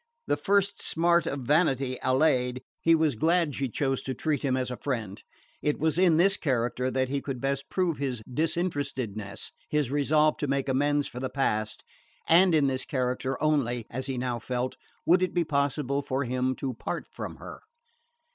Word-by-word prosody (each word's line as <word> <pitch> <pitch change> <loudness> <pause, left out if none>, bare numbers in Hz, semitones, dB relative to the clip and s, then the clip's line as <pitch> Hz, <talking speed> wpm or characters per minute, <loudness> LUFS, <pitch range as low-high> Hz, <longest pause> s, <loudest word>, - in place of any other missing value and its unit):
The - - +1
first 200 0 +1
smart 170 +1 +2
of 140 - -3
vanity 135 -2 +1
allayed, 130 -2 +2 0.2
he 165 0 +4
was 160 -3 +2
glad 165 +4 +2
she 135 -1 -2
chose 135 +2 -1
to 130 - -4
treat 150 +1 -1
him 130 -2 +1
as 125 -1 -2
a 125 - -4
friend. 110 -8 -4 0.4
It 150 - 0
was 160 +2 +1
in 175 -4 +5
this 195 +3 +5
character 125 -2 0
that 130 0 0
he 140 0 -1
could 135 -3 -4
best 140 +1 -2
prove 180 -6 0
his 130 -5 -3
disinterestedness, 135 - -2 0.2
his 150 -4 0
resolve 150 +2 +3
to 145 - -2
make 140 0 0
amends 145 +2 +2
for 125 - -7
the 130 0 -3
past; 110 -6 -1 0.4
and 175 +1 +6
in 150 -2 +4
this 130 -1 0
character 130 0 -2
only 125 -6 +1
as 130 +2 -3
he 135 -2 -3
now 125 -1 -2
felt 125 +2 -3 0.3
would 180 +2 +5
it 185 -1 -1
be 175 - +3
possible 140 -2 0
for 135 0 -2
him 130 +1 -1
to 130 -1 -3
part 115 - -4
from - - -6
her. - - -10
135 Hz, 185 wpm, -28 LUFS, 125-155 Hz, 0.4 s, and